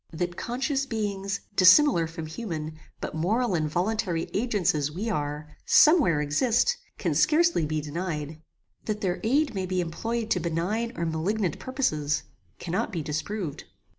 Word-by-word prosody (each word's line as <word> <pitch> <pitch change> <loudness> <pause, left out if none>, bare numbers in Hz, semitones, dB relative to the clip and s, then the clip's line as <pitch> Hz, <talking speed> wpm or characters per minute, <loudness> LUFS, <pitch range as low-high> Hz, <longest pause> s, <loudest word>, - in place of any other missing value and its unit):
That 175 +2 -3
conscious 270 - -2
beings, 200 -4 -2
dissimilar 185 - +6
from 165 0 -7
human, 155 -3 -5 0.2
but - - -5
moral 205 +8 0
and 155 -3 0
voluntary 180 -1 -1
agents 205 -5 +1
as 150 -1 -1
we 210 +8 -3
are, 150 -2 -4
some 315 +2 +6
where 165 - +2
exist, 235 - +2 0.2
can - - -1
scarcely 320 - +3
be 155 0 -1
denied. 155 -1 -4 0.4
That 210 -1 -2
their 180 -2 -1
aid 275 +4 +2
may 190 -2 -2
be 185 0 -1
employed 225 +7 -3
to 180 - +3
benign 175 +8 -1
or 170 - -1
malignant 170 +3 -1
purposes, 155 - -1 0.3
cannot 180 +5 -2
be 170 -6 -3
disproved. 155 +2 -4
185 Hz, 150 wpm, -27 LUFS, 160-225 Hz, 0.4 s, dissimilar